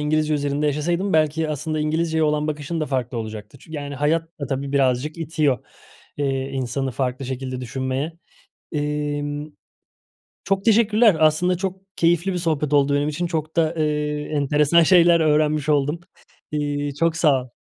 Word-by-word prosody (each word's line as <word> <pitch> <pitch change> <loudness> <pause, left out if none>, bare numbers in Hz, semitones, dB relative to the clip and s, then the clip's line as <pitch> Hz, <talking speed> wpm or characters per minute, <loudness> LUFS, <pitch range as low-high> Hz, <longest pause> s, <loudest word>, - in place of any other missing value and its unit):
İngilizce 155 +1 +1
üzerinde 145 0 -1
yaşasaydın 170 +7 0
belki 155 0 +2
aslında 155 +1 -3
İngilizceye 160 +1 0
olan 150 0 +1
bakışın 155 +2 -3
da 155 - -1
farklı 125 -3 -2
olacaktı. 110 -2 -7
Çü 160 - -16
yani 145 -2 -5
hayat 160 +4 0
da 140 - -2
tabii 135 +1 -3
birazcık 135 +3 +1
itiyor, 155 -5 0 0.6
eee, 135 -1 -1
insanı 135 0 -2
farklı 130 0 -2
şekilde 130 0 -4
düşünmeye. 130 +4 -3 0.6
Emm, 145 0 -3 0.9
çok 195 0 0
teşekkürler. 220 -2 +4
Aslında 160 +4 +3
çok 190 +1 -4 0.2
keyifli 170 +3 +2
bir 180 - -2
sohbet 155 -4 -1
oldu 140 -1 +3
benim 145 +1 +1
için. 160 +4 -2
Çok 160 -2 -3
da, 165 0 +2
eee, 150 -1 -1
enteresan 150 +3 +3
şeyler 170 0 +5
öğrenmiş 155 -1 +2
oldum. 150 +2 +1 0.5
İii, 145 -1 -2
çok 165 +2 +1
sağ 140 -6 +3
ol. 125 - -15
150 Hz, 155 wpm, -22 LUFS, 140-160 Hz, 0.9 s, şeyler